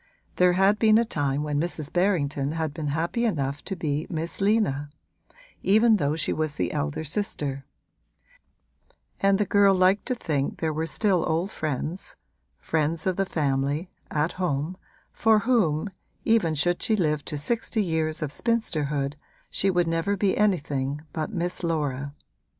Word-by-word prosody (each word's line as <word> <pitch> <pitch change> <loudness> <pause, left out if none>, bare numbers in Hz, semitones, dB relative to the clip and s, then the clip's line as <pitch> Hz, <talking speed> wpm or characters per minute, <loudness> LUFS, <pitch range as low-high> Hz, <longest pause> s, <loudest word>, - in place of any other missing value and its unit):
There 180 0 +5
had 195 +3 +3
been 215 -1 +5
a 235 - +3
time 145 -7 -1
when 150 -1 -1
Mrs. 160 -3 -2
Berrington 150 -6 +1
had 160 -2 -2
been 155 -1 -4
happy 165 +10 -1
enough 145 - -1
to 195 - -3
be 155 -1 -2
Miss 165 +2 -2
Lina, 195 -9 +1 0.7
even 220 +3 +5
though 145 -3 0
she 160 - 0
was 155 -2 -2
the 90 -1 -1
elder 75 - -2
sister; 145 -6 -2 1.5
and 195 0 +3
the 210 - +1
girl 200 -1 +4
liked 185 +2 +3
to 255 - 0
think 145 - -2
there 160 -2 -1
were 160 +2 -2
still 185 0 +1
old 170 +6 0
friends 155 - -3 0.4
friends 160 +1 -1
of 185 -1 +1
the 195 0 0
family, 145 +2 -1 0.2
at 155 +2 0
home, 170 -2 -2 0.4
for 225 -1 +4
whom, 205 -7 +1 0.3
even 215 -9 +3
should 175 +4 +1
she 220 - +2
live 150 -6 0
to 150 - -3
sixty 220 - -1
years 160 -3 -1
of 145 - -3
spinsterhood, 150 - -1 0.3
she 195 - +2
would 175 -2 +2
never 165 +5 0
be 195 0 +2
anything 145 -8 0
but 160 +4 -3
Miss 180 -2 -2
Laura. 145 -4 -2
165 Hz, 155 wpm, -26 LUFS, 145-195 Hz, 1.5 s, There